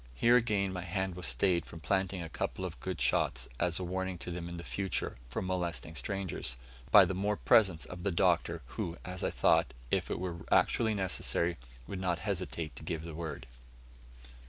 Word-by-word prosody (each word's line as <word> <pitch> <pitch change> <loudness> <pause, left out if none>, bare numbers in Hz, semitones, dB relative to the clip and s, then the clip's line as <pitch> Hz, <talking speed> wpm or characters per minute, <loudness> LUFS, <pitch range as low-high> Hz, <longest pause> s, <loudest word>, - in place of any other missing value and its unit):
Here, 120 - +5
again, 105 -5 +2
my 90 - -3
hand 95 +1 -2
was 90 0 -1
stayed 85 +8 +3
from 85 - -10
planting 95 0 0
a - - -5
couple 80 - -3
of - - -6
good - - -4
shots, - - +1
as 85 -1 +2
a 95 - -2
warning 95 +1 -2
to 90 - -6
them 85 0 -4
in 85 - -6
future 95 +2 -2
from 65 - -3
molesting 90 -3 -2
strangers, 80 -4 -2 0.3
by - - +9
the - - -2
more 100 +2 0
presence 95 -8 +4
of 90 -1 -8
the 100 - 0
Doctor, 85 -4 +2
who, 85 +7 -4
as 90 0 -5
I - - +2
thought, - - +3 0.2
if - - +1
it - - -1
were 90 -2 -3
actually 110 -2 +4
necessary, 90 -3 +1 0.3
would 95 - -5
not 90 -2 +1
hesitate 90 -6 -2
to - - -8
give 80 -1 -3
the 85 -1 -7
word. 80 0 -5
90 Hz, 190 wpm, -32 LUFS, 85-95 Hz, 0.3 s, by